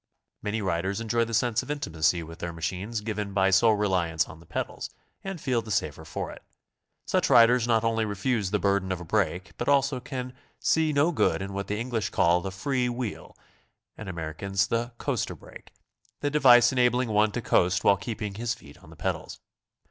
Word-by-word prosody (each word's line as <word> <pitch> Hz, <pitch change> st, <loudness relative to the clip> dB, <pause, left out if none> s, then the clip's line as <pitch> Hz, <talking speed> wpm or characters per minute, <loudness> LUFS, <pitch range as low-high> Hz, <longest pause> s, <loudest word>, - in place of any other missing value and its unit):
Many 105 Hz, +1 st, -2 dB
riders 95 Hz, +2 st, -1 dB
enjoy 115 Hz, +1 st, +1 dB
the 115 Hz, -, -7 dB
sense 120 Hz, 0 st, +2 dB
of -, -, -12 dB
intimacy 85 Hz, -, 0 dB
with 85 Hz, +2 st, -11 dB
their 85 Hz, -1 st, -4 dB
machines 90 Hz, +7 st, -4 dB
given 105 Hz, -2 st, -4 dB
by 95 Hz, 0 st, +3 dB
sole 110 Hz, +3 st, +5 dB
reliance 90 Hz, -6 st, +1 dB
on -, -, -12 dB
the 85 Hz, -, -18 dB
pedals, -, -, -4 dB, 0.3 s
and 195 Hz, -3 st, -5 dB
feel 130 Hz, -5 st, 0 dB
the 110 Hz, -, -11 dB
safer 80 Hz, -6 st, -1 dB
for 75 Hz, -, -5 dB
it. -, -, -12 dB, 0.6 s
Such -, -, +1 dB
riders 120 Hz, 0 st, +6 dB
not 115 Hz, -2 st, +3 dB
only 115 Hz, -1 st, +1 dB
refuse 105 Hz, 0 st, -1 dB
the 105 Hz, -, +1 dB
burden 100 Hz, -2 st, +1 dB
of 95 Hz, -, -2 dB
a 90 Hz, -, -8 dB
brake, 90 Hz, -1 st, -1 dB
but 120 Hz, -, -1 dB
also 140 Hz, -1 st, +3 dB
can 130 Hz, -1 st, -6 dB, 0.2 s
see 160 Hz, -1 st, +2 dB
no 145 Hz, +4 st, +3 dB
good 80 Hz, -, +1 dB
in 95 Hz, 0 st, -5 dB
what 100 Hz, 0 st, -4 dB
the 105 Hz, -, -2 dB
English 115 Hz, -4 st, -2 dB
call 85 Hz, +1 st, +3 dB
the 95 Hz, -, -4 dB
^'free 125 Hz, +6 st, -1 dB
wheel," 120 Hz, -3 st, -5 dB, 0.6 s
and 105 Hz, -3 st, -8 dB
Amer 80 Hz, -3 st, -5 dB
icans 95 Hz, +3 st, -1 dB
the 115 Hz, +1 st, -1 dB
"coaster -, -, -2 dB
brake," -, -, -14 dB, 0.2 s
— -, -, -40 dB
the 145 Hz, -, 0 dB
device 125 Hz, -5 st, +6 dB
enabling 125 Hz, -1 st, +2 dB
one 105 Hz, 0 st, +3 dB
to 120 Hz, -, -2 dB
coast 90 Hz, -1 st, +2 dB
while 100 Hz, -, +6 dB
keeping 105 Hz, +1 st, -5 dB
his 115 Hz, +3 st, -2 dB
feet -, -, -16 dB
on -, -, -17 dB
the -, -, -13 dB
pedals. -, -, -4 dB
105 Hz, 200 wpm, -27 LUFS, 95-120 Hz, 0.6 s, riders